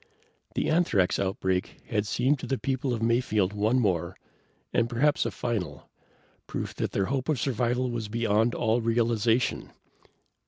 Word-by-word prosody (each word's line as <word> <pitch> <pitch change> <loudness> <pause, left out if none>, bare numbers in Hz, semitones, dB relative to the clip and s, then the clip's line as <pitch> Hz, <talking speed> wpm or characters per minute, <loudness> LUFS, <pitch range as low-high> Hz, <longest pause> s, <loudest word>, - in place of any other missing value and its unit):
The - - 0
anthrax 135 - +2
outbreak 95 -2 -1
had 105 -2 -1
seemed 130 +6 +1
to - - -6
the 135 - 0
people 130 0 -1
of 115 -2 -2
Mayfield 115 -4 +1
one 105 +4 +2
more, 90 -7 0 0.6
and 115 0 +2
perhaps 140 +5 +2
a - - 0
final, 90 - -4 0.6
proof - - -4
that - - -1
their 100 - 0
hope 130 +5 -2
of 150 -6 +1
survival 125 0 0
was 115 -2 -3
beyond 115 +1 +1
all 115 0 +1
realization. 115 0 +1
115 Hz, 150 wpm, -27 LUFS, 105-125 Hz, 0.6 s, anthrax